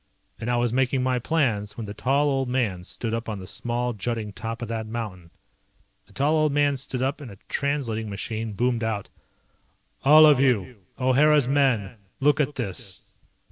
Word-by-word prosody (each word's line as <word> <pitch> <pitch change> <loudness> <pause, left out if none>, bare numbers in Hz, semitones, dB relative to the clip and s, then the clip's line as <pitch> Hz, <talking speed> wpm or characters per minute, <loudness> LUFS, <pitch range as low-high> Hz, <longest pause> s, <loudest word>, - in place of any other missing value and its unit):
And 115 - -4
I 120 - +2
was 120 -1 +1
making 130 0 +1
my 130 -1 +1
plans 115 -8 0
when 115 - -4
the 100 - -6
tall 140 +6 +1
old 135 -2 0
man 110 -9 -1
stood 115 +4 -4
up 115 0 -3
on 105 - -3
the 95 - -8
small, 120 +4 -2
jutting 110 0 -3
top 115 +3 -5
of - - -4
that 110 -1 -3
mountain. 105 -7 -6 0.8
The - - -21
tall 145 +3 +1
old 155 -1 +2
man 145 0 +2
stood 130 -1 -3
up 135 +3 -1
and 135 - -8
a 100 - -12
translating 125 -7 -1
machine 110 +2 -4
boomed 120 +2 0
out. 110 -3 -3 0.9
"All 155 +3 +8
of 150 -4 +6
you! 125 -3 +1 0.2
O'Hara's 140 +2 +4
men! 125 -6 +1 0.2
Look 145 +1 +3
at 150 -1 0
this!" 100 -5 -6
120 Hz, 180 wpm, -25 LUFS, 110-135 Hz, 0.9 s, All